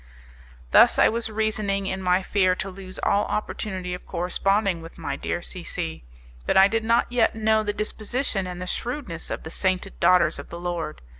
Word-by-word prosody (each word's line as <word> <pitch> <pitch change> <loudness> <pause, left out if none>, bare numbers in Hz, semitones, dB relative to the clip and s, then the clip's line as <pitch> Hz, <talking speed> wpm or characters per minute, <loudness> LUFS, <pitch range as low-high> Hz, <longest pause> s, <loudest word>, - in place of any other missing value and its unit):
Thus - - +7
I - - +6
was 230 0 -2
reasoning 215 -2 0
in 190 0 -3
my 180 +1 +2
fear 185 -2 +2
to 195 +1 -4
lose 185 0 -9
all 200 - +3
opportunity 190 -4 -3
of 180 - -8
corresponding 185 +1 0
with 165 - -11
my - - -3
dear - - -3
C - - -8
C, 80 -4 -5 0.4
but - - +3
I 190 0 +8
did 225 +2 -1
not 230 +2 +2
yet 235 -3 +2
know 220 0 +2
the 210 -1 -1
disposition 215 0 -2
and 180 -1 -6
the 180 - -4
shrewdness 235 - -4
of - - -4
the 160 - -7
sainted 190 +1 -1
daughters 175 -3 +4
of - - -9
the 170 - -7
Lord. 175 - -4
195 Hz, 195 wpm, -25 LUFS, 180-215 Hz, 0.4 s, I